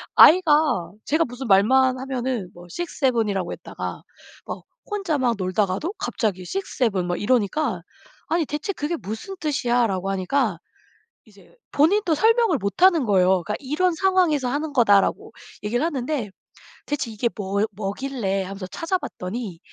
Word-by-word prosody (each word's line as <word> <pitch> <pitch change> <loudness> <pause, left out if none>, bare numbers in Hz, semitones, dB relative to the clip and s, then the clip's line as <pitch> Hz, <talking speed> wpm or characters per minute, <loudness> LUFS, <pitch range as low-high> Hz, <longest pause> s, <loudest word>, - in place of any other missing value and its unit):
아이가 305 - +6
제가 320 +3 +2
무슨 250 +1 -7
말만 255 +6 +4
하면은 255 -7 -3
뭐 175 0 -13
6-7 255 - 0
이라고 190 -3 -2
했다가 - - -7 0.4
막 - - -6 0.3
혼자 390 -7 -1
막 245 -3 +1
놀다가도 195 - -1
갑자기 200 -5 -2
6-7 220 - -1
막 175 - -2
이러니까 230 - +1 0.5
"아니 330 0 +1
대체 295 +8 -3
그게 310 +2 -2
무슨 220 - -6
뜻이야?"라고 240 - 0
하니까 195 - 0 0.7
이제 205 - -21 0.2
본인도 345 +4 +3
설명을 450 - +3
못하는 300 - +3
거예요. 190 -3 +3
그러니까 210 - -3
"이런 315 +6 0
상황에서 355 -8 +2
하는 295 +2 -2
거다."라고 205 -6 +3 0.3
얘기를 240 +7 0
하는데 270 -7 -2 0.6
"대체 280 -5 -3
이게 225 +2 -1
뭐 200 0 -1
뭐길래." 200 0 -2
하면서 190 0 -7
찾아봤더니 230 - -4
250 Hz, 315 characters per minute, -23 LUFS, 200-310 Hz, 0.7 s, 아이가